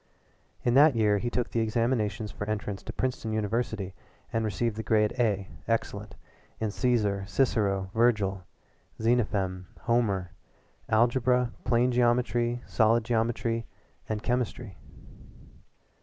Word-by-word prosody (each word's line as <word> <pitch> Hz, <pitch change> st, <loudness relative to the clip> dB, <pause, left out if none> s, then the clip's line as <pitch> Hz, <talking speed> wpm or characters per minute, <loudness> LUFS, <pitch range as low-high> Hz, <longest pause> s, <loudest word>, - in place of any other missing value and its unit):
In 120 Hz, -, +2 dB
that 145 Hz, +1 st, +6 dB
year 105 Hz, -2 st, +3 dB
he 120 Hz, -, -2 dB
took 120 Hz, 0 st, -2 dB
the 115 Hz, -, 0 dB
examinations 110 Hz, -2 st, 0 dB
for 105 Hz, +2 st, -6 dB
entrance 105 Hz, -2 st, -3 dB
to -, -, -7 dB
Princeton 125 Hz, -3 st, -2 dB
University 110 Hz, -2 st, -2 dB, 0.4 s
and 115 Hz, -, +1 dB
received 110 Hz, +1 st, -1 dB
the 110 Hz, -, -3 dB
Grade 105 Hz, -1 st, +2 dB
A 100 Hz, -5 st, +1 dB, 0.2 s
excellent 105 Hz, -2 st, -2 dB, 0.4 s
in 110 Hz, -, -1 dB
Cæsar, 105 Hz, -4 st, 0 dB
Cicero, 100 Hz, -7 st, +1 dB
Vergil, 105 Hz, -5 st, +2 dB, 0.6 s
Xenophon, 100 Hz, -6 st, 0 dB
Homer, 105 Hz, -7 st, +1 dB, 0.6 s
Algebra, 125 Hz, +2 st, +3 dB
Plane 120 Hz, +1 st, +3 dB
Geometry, 120 Hz, 0 st, +1 dB
Solid 115 Hz, 0 st, +3 dB
Geometry, 115 Hz, 0 st, 0 dB, 0.4 s
and 105 Hz, -1 st, -2 dB
Chemistry. 120 Hz, -4 st, -2 dB
115 Hz, 115 wpm, -28 LUFS, 105-120 Hz, 0.6 s, that